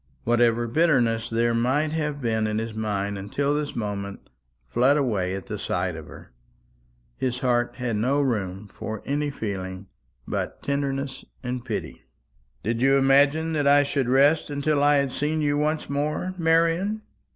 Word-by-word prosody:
Whatever 120 Hz, 0 st, +2 dB
bitterness 120 Hz, -5 st, +2 dB
there 115 Hz, +1 st, +1 dB
might 130 Hz, +6 st, +1 dB
have 150 Hz, -2 st, -2 dB
been 110 Hz, -2 st, +1 dB
in 105 Hz, 0 st, -1 dB
his 115 Hz, 0 st, -3 dB
mind 100 Hz, -2 st, -2 dB
until 140 Hz, +9 st, -1 dB
this 150 Hz, -1 st, -2 dB
moment 100 Hz, -3 st, -5 dB, 0.3 s
fled 125 Hz, -, +3 dB
away 100 Hz, -9 st, 0 dB
at 95 Hz, +5 st, -7 dB
sight 90 Hz, -2 st, -1 dB
of 80 Hz, -2 st, -9 dB
her. -, -, -13 dB, 0.9 s
His 125 Hz, -1 st, -1 dB
heart 120 Hz, -2 st, +1 dB
had 120 Hz, -4 st, -2 dB
no 130 Hz, +7 st, +1 dB
room 105 Hz, -7 st, -1 dB
for 110 Hz, +1 st, -6 dB
any 145 Hz, +1 st, 0 dB
feeling 95 Hz, -7 st, -5 dB, 0.4 s
but -, -, -4 dB
tenderness 140 Hz, -1 st, -2 dB, 0.2 s
and 125 Hz, -1 st, -3 dB
pity. 115 Hz, -4 st, -5 dB, 0.6 s
"Did 115 Hz, +2 st, -1 dB
you 135 Hz, +1 st, +5 dB
imagine 140 Hz, +4 st, +4 dB
that 145 Hz, -2 st, +1 dB
I 145 Hz, 0 st, +6 dB
should 140 Hz, -3 st, -1 dB
rest 140 Hz, +5 st, +4 dB
until 145 Hz, 0 st, 0 dB
I 145 Hz, 0 st, +5 dB
had 140 Hz, -2 st, +1 dB
seen 150 Hz, +4 st, -1 dB
you 145 Hz, -1 st, +1 dB
once 150 Hz, +1 st, 0 dB
more, 150 Hz, +6 st, -2 dB
Marian? 170 Hz, +5 st, +2 dB
130 Hz, 155 wpm, -25 LUFS, 110-145 Hz, 0.9 s, I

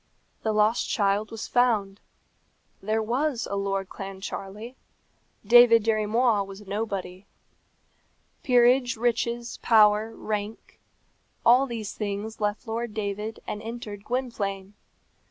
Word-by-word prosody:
The 220 Hz, -, 0 dB
lost 215 Hz, +2 st, +2 dB
child 205 Hz, 0 st, +1 dB
was 225 Hz, -1 st, -6 dB
found. 215 Hz, -5 st, +1 dB, 0.8 s
There 220 Hz, +2 st, 0 dB
was 250 Hz, +2 st, -1 dB
a -, -, -1 dB
Lord 195 Hz, -1 st, -2 dB
Clancharlie; 195 Hz, +3 st, -7 dB, 0.7 s
David 230 Hz, 0 st, +7 dB
Dirry 215 Hz, -1 st, +1 dB
Moir 225 Hz, -2 st, +2 dB
was 195 Hz, +1 st, -11 dB
nobody. 195 Hz, -2 st, -4 dB, 1.1 s
Peerage, 245 Hz, -3 st, +3 dB
riches, 235 Hz, +1 st, -1 dB
power, 215 Hz, 0 st, +4 dB
rank 210 Hz, 0 st, -5 dB, 0.7 s
all 250 Hz, +3 st, +6 dB
these 225 Hz, -4 st, -5 dB
things 210 Hz, +1 st, -5 dB
left 210 Hz, +3 st, -1 dB
Lord 225 Hz, 0 st, -4 dB
David 210 Hz, +1 st, -4 dB
and 210 Hz, -, -5 dB
entered 220 Hz, -3 st, -7 dB
Gwynplaine. 205 Hz, -6 st, -3 dB
215 Hz, 110 wpm, -26 LUFS, 200-235 Hz, 1.1 s, David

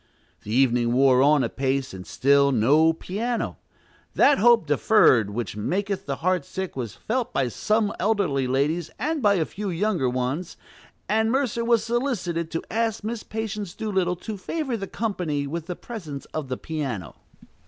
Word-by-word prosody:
The 105 Hz, -, -8 dB
evening 120 Hz, -1 st, +3 dB
wore 130 Hz, 0 st, +5 dB
on 145 Hz, 0 st, +4 dB
apace, 135 Hz, -2 st, -1 dB
and 95 Hz, -1 st, -9 dB
still 140 Hz, +1 st, +3 dB
no 145 Hz, +7 st, +4 dB
piano. 220 Hz, +9 st, -3 dB, 0.6 s
That 285 Hz, -, +5 dB
hope 235 Hz, -2 st, +5 dB
deferred 145 Hz, -, +4 dB
which 105 Hz, -1 st, -4 dB
maketh 195 Hz, -, -2 dB
the 140 Hz, -, -1 dB
heart 185 Hz, -4 st, +2 dB
sick 190 Hz, +5 st, -5 dB
was 120 Hz, -5 st, -5 dB
felt 245 Hz, +1 st, -2 dB
by 130 Hz, -2 st, 0 dB
some 210 Hz, -, 0 dB
elderly 180 Hz, -11 st, +1 dB
ladies 150 Hz, +6 st, 0 dB
and 305 Hz, +5 st, -1 dB
by 205 Hz, -3 st, +4 dB
a 165 Hz, -4 st, +1 dB
few 205 Hz, +4 st, -5 dB
younger 180 Hz, -6 st, 0 dB
ones; 130 Hz, +8 st, -3 dB, 0.5 s
and 220 Hz, +1 st, +2 dB
Mercer 255 Hz, -3 st, 0 dB
was 230 Hz, -2 st, +3 dB
solicited 220 Hz, -, -1 dB
to 165 Hz, -, -3 dB
ask 225 Hz, -1 st, -1 dB
Miss 225 Hz, +1 st, -3 dB
Patience 215 Hz, -4 st, -5 dB
Doolittle 190 Hz, -5 st, 0 dB
to 210 Hz, +4 st, -7 dB
favor 270 Hz, -, -3 dB
the 195 Hz, -3 st, -5 dB
company 180 Hz, -11 st, -2 dB
with 165 Hz, +3 st, -5 dB
the 180 Hz, -, -4 dB
presence 165 Hz, -, -7 dB
of 155 Hz, -3 st, -3 dB
the 130 Hz, -, -3 dB
piano. 130 Hz, -, -5 dB
175 Hz, 165 wpm, -24 LUFS, 135-215 Hz, 0.6 s, wore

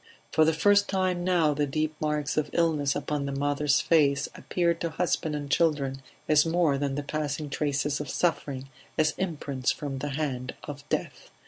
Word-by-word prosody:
For 155 Hz, -, +4 dB
the 160 Hz, -, +4 dB
first 205 Hz, +5 st, +4 dB
time 185 Hz, -2 st, 0 dB
now 175 Hz, -4 st, +3 dB
the 145 Hz, 0 st, 0 dB
deep 155 Hz, +2 st, -1 dB
marks 150 Hz, -2 st, -1 dB
of 155 Hz, -1 st, 0 dB
illness 155 Hz, -5 st, +2 dB
upon 145 Hz, -2 st, -2 dB
the -, -, -2 dB
mother's 145 Hz, +1 st, +1 dB
face 140 Hz, -4 st, +3 dB
appeared 170 Hz, -2 st, -1 dB
to 170 Hz, -, 0 dB
husband 160 Hz, -2 st, -1 dB
and 145 Hz, -1 st, -4 dB
children 140 Hz, -4 st, +1 dB, 0.3 s
as 150 Hz, -1 st, +5 dB
more 165 Hz, -4 st, +2 dB
than 140 Hz, -1 st, -1 dB
the 145 Hz, -, -2 dB
passing 150 Hz, 0 st, -3 dB
traces 145 Hz, 0 st, 0 dB
of 145 Hz, -, -6 dB
suffering, 140 Hz, -5 st, -1 dB, 0.3 s
as 155 Hz, -1 st, +3 dB
imprints 145 Hz, -8 st, -2 dB
from 140 Hz, -2 st, -4 dB
the 145 Hz, -, -3 dB
hand 135 Hz, -3 st, -3 dB
of 145 Hz, 0 st, -9 dB
death. -, -, -3 dB
150 Hz, 180 wpm, -27 LUFS, 140-160 Hz, 0.3 s, as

